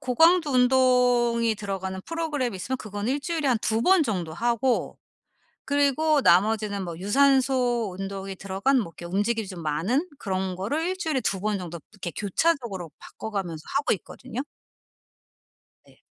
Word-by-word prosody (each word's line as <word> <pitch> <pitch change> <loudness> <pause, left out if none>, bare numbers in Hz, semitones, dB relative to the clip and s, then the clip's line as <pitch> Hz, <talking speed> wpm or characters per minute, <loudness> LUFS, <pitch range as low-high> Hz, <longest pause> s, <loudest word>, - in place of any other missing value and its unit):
고강도 325 +5 +4
운동이 250 -3 +3
들어가는 195 -2 -4
프로그램 310 -7 -2
있으면 235 +8 -3
그건 205 -3 -5
1 275 +3 0
주일에 325 -1 -2
한 255 -3 +3
2 220 +1 +1
번 370 +1 +5
정도 185 - -2
하고 240 +5 0 0.7
그리고 285 +2 +2
나머지는 205 0 +3
뭐 170 -2 -6
유산소 250 0 +2
운동이 195 0 -5
들어간 195 +8 +1
뭐 170 -8 -4
이렇게 - - -9
움직임이 220 +3 +1
좀 180 -3 -7
많은 185 - 0
그런 190 -2 -2
거를 230 - -2
1 370 - -2
주일에 315 -6 -1
2 195 -6 -2
번 210 0 0
정도 170 -3 -7
이렇게 190 -5 -6
교차적으로 210 - -1
바꿔 220 - -8
가면서 175 -6 -4
하고 280 +1 +2
있거든요. 250 +5 -9 1.5
네. - - -23
230 Hz, 320 characters per minute, -25 LUFS, 195-270 Hz, 1.5 s, 번